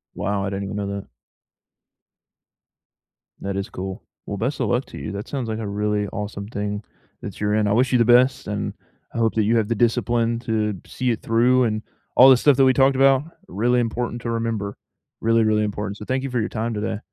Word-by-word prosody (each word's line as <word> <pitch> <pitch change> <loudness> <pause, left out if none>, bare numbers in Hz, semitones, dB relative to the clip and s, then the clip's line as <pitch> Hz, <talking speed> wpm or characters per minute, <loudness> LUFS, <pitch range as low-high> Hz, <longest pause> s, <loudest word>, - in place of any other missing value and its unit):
Wow, 100 0 -1
I - - -1
didn't 100 0 -3
even 100 - -5
know 100 -1 -2
that. 100 0 -5 2.3
That 100 0 -3
is 100 - -3
cool, 95 0 -6 0.2
well, 100 - -4
best 130 +8 -2
a - - +1
luck 125 +2 0
to - - -10
you, - - -5
that 100 +1 -6
sounds 130 -4 -3
like 110 0 -3
a 110 - -4
really 105 0 -1
awesome 100 -1 -5
thing 105 -1 -4 0.4
that - - -7
you're 105 0 0
in, 105 -1 +2
I 100 - +2
wish 125 +3 +2
you 125 - +4
the 115 - +4
best, 125 +3 +4
and 105 0 -3 0.4
I - - -5
hope 115 -1 +1
that 110 - +3
you 115 +3 +2
have 110 -1 0
the 115 - +1
discipline 115 0 +1
to 110 -4 -1
see 125 -1 -1
it 115 - -3
through, 125 +3 +3
and 110 -2 0 0.3
all 130 +2 +9
the 130 - +8
stuff 140 +1 +4
that 135 - +5
we 130 - +5
talked 135 0 +3
about, 135 0 +5 0.2
really 120 +6 +1
important 120 0 -2
to 115 - -3
remember, 115 -3 -2 0.4
really, 115 0 +3
really 110 0 +2
important. 105 -1 -3
So 105 - -9
thank 130 +2 -1
you 135 - -3
for 125 -1 -1
your 110 - -1
time 115 +1 -2
today. 105 0 -3
110 Hz, 225 wpm, -22 LUFS, 105-120 Hz, 2.3 s, all